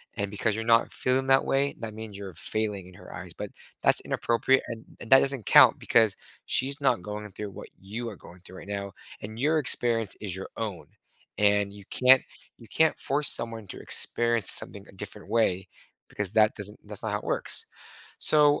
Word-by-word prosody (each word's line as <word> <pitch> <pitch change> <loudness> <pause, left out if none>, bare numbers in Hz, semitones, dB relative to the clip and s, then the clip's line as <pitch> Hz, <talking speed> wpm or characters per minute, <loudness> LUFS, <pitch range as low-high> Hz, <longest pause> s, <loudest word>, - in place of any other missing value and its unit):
And 100 0 -4
because 105 +1 -1
you're 115 - -4
not 115 0 +3
feeling 130 +1 -1
that 135 0 +3
way, 140 +1 0
that 110 -2 -6
means 110 -2 -9
you're 100 -2 -9
failing 100 +2 -2
in 90 - -16
her - - -13
eyes. - - -9
But - - -7 0.3
that's - - +4
inappropriate, 125 +3 0
an 115 -1 -8 0.2
and 120 - -10
that 135 - +9
doesn't 135 -6 0
count - - +6
because 110 -4 +2 0.3
she's 140 +2 0
not 125 -9 +1
going 105 0 -7
through 105 +1 -7
what - - -11
you 115 +5 -6
are 105 - -9
going 90 +1 -16
through 95 0 -13
right - - -12
now, 100 -1 -5 0.3
and 110 +2 -9
your 155 +4 +1
experience 115 -6 +2
is 95 -4 -4
your 95 - -7
own. 105 -6 -5 0.5
And 105 -1 +2
you 100 0 -13
can't 130 +1 +5 0.3
you 115 - -16
can't 160 +8 +1
force 145 +2 +1
someone 115 -3 0
to - - -9
experience 115 -3 +3
something 100 0 +1
a - - -13
different - - -9
way 95 -5 0 0.4
because 100 -2 -2
that 110 -1 +3
doesn't 105 0 -5
that's 105 -1 -2
not 110 - -3
how 105 - -2
it - - -17
works. - - -3 0.5
So 150 -1 +5
110 Hz, 200 wpm, -26 LUFS, 100-120 Hz, 0.5 s, that